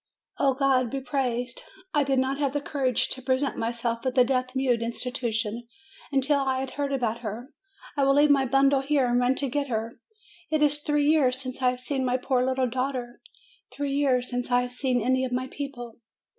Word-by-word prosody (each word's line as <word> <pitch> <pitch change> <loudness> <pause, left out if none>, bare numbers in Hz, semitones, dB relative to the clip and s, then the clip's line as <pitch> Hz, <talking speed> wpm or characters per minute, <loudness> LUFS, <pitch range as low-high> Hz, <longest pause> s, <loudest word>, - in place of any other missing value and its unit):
"Oh, 270 -2 +3
God 260 -3 +2
be 275 - -3
praised! 255 -3 -2 0.3
I 295 - +3
did 270 -1 0
not 265 +2 0
have 280 -2 0
the 290 - 0
courage 270 -4 0
to 260 - -5
present 260 +2 0
myself 230 0 -2
at 260 -1 -1
the 255 - +6
Deaf 255 0 -1
mute 255 -3 +1
Institution 235 -1 -2 0.4
until 280 +1 +2
I 265 -1 0
had 265 0 -4
heard 285 -1 -2
about 235 -4 -1
her. 235 +5 -7 0.4
I 280 - +1
will 275 0 +4
leave 290 +1 +5
my 275 -2 +4
bundle 275 +1 +3
here, 275 -1 +2
and 245 0 +2
run 250 +1 +2
to 280 - -1
get 280 +2 -1
her. 230 -1 -3 0.5
It 310 -1 +2
is 295 0 +3
three 295 -1 +1
years 280 -4 +3
since 255 0 -6
I 250 - +4
have 250 0 -3
seen 265 +1 -1
my 250 0 +1
poor 255 0 0
little 260 0 +1
daughter! 255 -1 -3 0.5
Three 285 -1 -3
years 260 -3 +2
since 245 0 -3
I 245 0 +3
have 250 0 -6
seen 250 -1 0
any 260 +2 +2
of 255 - -2
my 250 +1 -1
people 260 -5 -6
260 Hz, 210 wpm, -26 LUFS, 245-275 Hz, 0.5 s, the